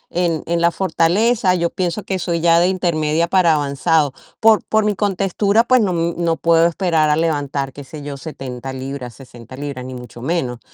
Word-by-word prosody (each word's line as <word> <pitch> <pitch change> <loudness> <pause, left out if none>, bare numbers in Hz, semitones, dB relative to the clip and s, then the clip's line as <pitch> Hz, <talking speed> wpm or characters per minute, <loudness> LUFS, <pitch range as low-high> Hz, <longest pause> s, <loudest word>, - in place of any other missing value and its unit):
en 170 -3 0
en 170 0 -1
la 170 - +4
fortaleza, 185 +4 +1
yo 170 -1 -1
pienso 185 +3 -2
que 190 -1 -3
soy 170 -1 -1
ya 170 0 +4
de 175 - +3
intermedia 170 -3 0
para 170 -3 +3
avanzado. 145 0 +1 0.3
Por 220 -1 +4
por 220 -1 +1
mi 210 -1 +1
contextura, 200 +2 +1
pues 255 0 +3
no 195 - +1
no 170 0 -1
puedo 165 0 +4
esperar 165 -3 +1
a 150 - +3
levantar, 145 -4 -1
qué 145 - -9
sé 145 +2 -10
yo, 145 -1 -6
70 135 -3 -7
libras, 130 -2 -6
60 125 -2 -13
libras 140 -2 -6
ni 130 0 -7
mucho 120 -1 -10
menos, 130 -4 -2
165 Hz, 190 wpm, -19 LUFS, 140-180 Hz, 0.3 s, la